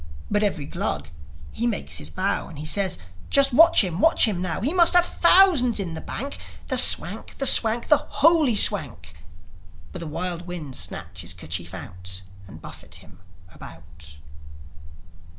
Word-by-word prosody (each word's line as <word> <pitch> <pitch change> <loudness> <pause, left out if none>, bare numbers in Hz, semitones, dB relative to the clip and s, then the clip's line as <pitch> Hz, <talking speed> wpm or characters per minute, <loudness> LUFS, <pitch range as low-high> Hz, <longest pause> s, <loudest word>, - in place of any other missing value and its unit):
But 205 0 +1
every 190 -8 -2
Glug, 75 - -5 0.4
he 235 - -3
makes 225 -4 -3
his - - -9
bow, 195 +2 -3
And 155 -1 -8
says, 190 +3 -1 0.3
"Just 275 -2 +3
watch 330 -1 +6
him! 180 -2 -4
Watch 325 +8 +4
him 190 -5 -3
now! 175 -3 -3
He 275 - -1
must 355 -1 +5
have 355 0 +6
thousands 340 - +4
in 180 -4 -5
the 160 - -7
bank! 275 +3 -6 0.3
The - - 0
Swank! - - 0
The 275 - -2
Swank! 230 -2 +2
The 300 - +5
holy 305 -6 +2
Swank!" 130 - +2 0.8
But - - -8
the 165 - -7
wild 175 +2 -6
winds 155 -7 -5
snatch 85 -1 -3
his 85 +1 -5
kerchief 85 0 -5
out, 95 +1 -8 0.2
And 95 - -14
buffet - - -11
him 95 -2 -14 0.3
about. 80 -2 -14
185 Hz, 160 wpm, -23 LUFS, -, 0.8 s, watch